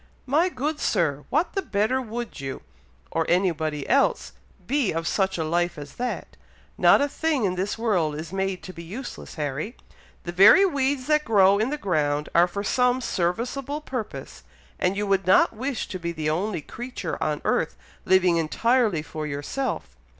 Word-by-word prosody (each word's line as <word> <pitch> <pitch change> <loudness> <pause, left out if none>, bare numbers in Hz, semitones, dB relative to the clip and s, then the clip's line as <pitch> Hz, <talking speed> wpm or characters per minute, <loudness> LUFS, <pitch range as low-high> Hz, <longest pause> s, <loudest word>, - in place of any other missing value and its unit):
"My 310 +8 +2
good 295 +1 -3
Sir! 145 -3 0
what 310 +6 +1
the 390 - 0
better 220 - 0
would 235 0 -6
you, 135 -1 -6 0.5
or 165 - +1
anybody 160 -5 0
else, 275 - +2 0.3
be 280 -6 +1
of 165 +1 -2
such 190 -2 0
a 160 - -1
life 175 +2 0
as 145 -1 -9
that! 250 0 -4 0.4
Not - - +5
a 285 - +2
thing 295 -4 0
in 185 - +1
this 190 +4 -2
world 185 -10 +1
is 155 +4 -7
made 195 -1 -2
to 185 - -8
be 170 - -9
useless, 215 +10 -8
Harry; 150 - -4 0.5
the 175 - -4
very 200 - +7
weeds 275 -5 0
that 300 +1 +2
grow 200 -5 +4
in 220 +4 +1
the 300 - -2
ground 150 - 0
are 170 +1 +5
for 200 +3 -4
some 250 +4 +2
serviceable 245 - -2
purpose, 225 - -6 0.4
and 185 +1 +1
you 205 - 0
would 195 -2 +1
not 190 +4 +5
wish 260 +2 -3
to 185 - -5
be 170 0 -3
the 155 -2 -2
only 180 +1 -1
creature 245 - -6
on - - -1
earth - - 0 0.3
living 185 -2 +4
entirely 210 +2 +1
for 155 0 -5
yourself. 150 - -4
195 Hz, 175 wpm, -25 LUFS, 165-255 Hz, 0.5 s, very